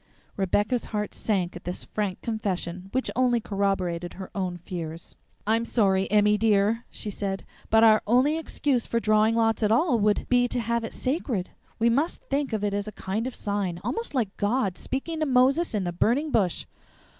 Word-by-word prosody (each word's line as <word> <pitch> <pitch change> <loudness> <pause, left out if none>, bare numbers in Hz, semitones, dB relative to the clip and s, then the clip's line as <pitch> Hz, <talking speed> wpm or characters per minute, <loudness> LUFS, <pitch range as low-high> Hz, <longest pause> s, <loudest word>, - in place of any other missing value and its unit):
Rebecca's 205 +5 +1
heart 210 -1 -3
sank 185 -5 -1
at 175 - -9
this 180 +1 -4
frank 205 -3 -3
confession, 190 -5 -3
which 260 +1 -1
only 245 -2 +3
corroborated 195 -5 -1
her 190 0 -8
own 185 -3 -2
fears. 170 -2 -7 0.3
"I'm 225 +2 +2
sorry, 195 -5 +2
Emmy, 210 0 +4
dear," 220 +1 +2
she 210 - -5
said, 195 -1 -3 0.2
"but 225 0 +5
our 215 -1 +6
only 255 +7 +4
excuse 285 -6 -1
for 235 - 0
drawing 215 0 +3
lots 225 0 +2
at 210 -1 +2
all 245 +1 +3
would 210 0 +2
be 245 0 +3
to 245 - -2
have 235 0 -1
it 225 - -6
sacred. 255 - -2 0.3
We 235 +1 +3
must 290 +8 0
think 280 0 -1
of 215 -2 -2
it 205 -1 0
as 205 +1 -2
a - - -4
kind 210 +4 -3
of 260 - -5
a - - -8
sign, 200 -4 -2
almost 460 -9 -3
like 220 -6 0
God 205 -2 0
speaking 315 +5 -4
to 310 - 0
Moses 265 +3 +3
in 205 - 0
the 175 -1 -3
burning 265 - +1
bush." 190 -9 +1
215 Hz, 190 wpm, -26 LUFS, 195-245 Hz, 0.3 s, our